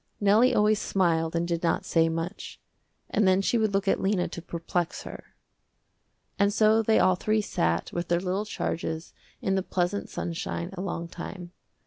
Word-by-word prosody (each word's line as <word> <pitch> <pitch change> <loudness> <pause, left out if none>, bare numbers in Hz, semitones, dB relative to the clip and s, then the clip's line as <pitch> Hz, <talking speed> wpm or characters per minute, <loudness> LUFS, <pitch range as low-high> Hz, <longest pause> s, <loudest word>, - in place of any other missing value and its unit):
Nellie 215 +5 +4
always 210 0 +3
smiled 165 -4 +1
and 170 +1 0
did 170 -1 -1
not 170 - 0
say 165 -1 +3
much, 165 +2 -5 0.5
and 210 - +3
then 185 0 +4
she 225 +4 +1
would 215 -2 +1
look 195 0 0
at - - +2
Lena 190 -2 +1
to 170 - -7
perplex 170 0 -3
her. - - -11 1.0
And 200 0 +4
so 220 +1 +4
they 220 0 +3
all 185 - +5
three 215 +4 +1
sat 85 - -1
with 175 0 -2
their 170 0 +2
little 190 +3 -2
charges 160 -5 -4 0.3
in 190 - +1
the 190 - +2
pleasant 185 +2 -2
sunshine 170 +1 -4
a 185 - -5
long 170 -3 -3
time. 175 +1 -8
185 Hz, 175 wpm, -27 LUFS, 170-205 Hz, 1.0 s, all